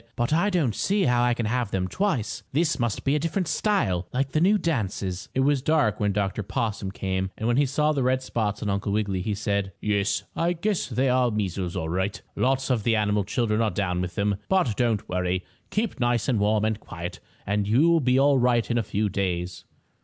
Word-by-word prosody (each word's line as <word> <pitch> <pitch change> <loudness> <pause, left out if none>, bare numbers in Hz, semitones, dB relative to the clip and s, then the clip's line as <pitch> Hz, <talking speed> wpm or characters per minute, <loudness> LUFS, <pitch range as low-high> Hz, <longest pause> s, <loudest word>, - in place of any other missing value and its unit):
"But 120 +5 0
I 170 +6 +3
don't 160 - +1
see 200 - +1
how 125 -4 +3
I 120 -1 +2
can 120 - -2
have 120 0 0
them 95 -2 -1
twice. 155 - -1
This 160 +3 +1
must 120 -3 -1
be 135 - +2
a - - +2
different 165 +4 -1
style, 160 - 0
like 135 +1 -1
the 155 - +1
new 200 +4 +5
dances." 100 - -2
It 130 - +2
was 140 0 +2
dark 140 -8 +2
when 105 -1 +1
Dr. 100 +1 -1
Possum 105 -2 -2
came, 95 -1 -2
and 110 - -2
when 120 +1 +2
he 145 -1 +3
saw 150 +3 +1
the 140 -3 0
red 130 +1 +1
spots 105 -5 -2
on 105 - -1
Uncle 100 +1 -1
Wiggily, 100 -3 0
he 105 +2 -2
said: 100 -2 -1
"Yes, 100 -1 0
I 170 +1 +1
guess 195 +3 -1
they're 130 0 +1
the 125 -1 +2
measles 95 -4 -2
all 80 - -2
right. 95 +5 -1 0.2
Lots 135 +1 +1
of 120 -3 +2
the 115 +2 +2
animal 105 -1 +1
children 110 +1 0
are 110 - +2
down 90 -2 -1
with 90 -1 -4
them. 100 0 0
But 180 - +2
don't 115 -3 0
worry. 90 0 -1 0.2
Keep 215 -7 -2
nice 120 -2 +1
and 120 -5 +2
warm 105 +1 +2
and 110 -1 -1
quiet, 85 -4 -7 0.3
and 100 0 0
you'll 160 +10 +4
be 125 -2 +2
all 140 -1 +4
right 120 -1 +2
in 120 - +2
a - - +2
few 105 +1 -1
days." 90 -2 -3
110 Hz, 220 wpm, -25 LUFS, 100-135 Hz, 0.3 s, new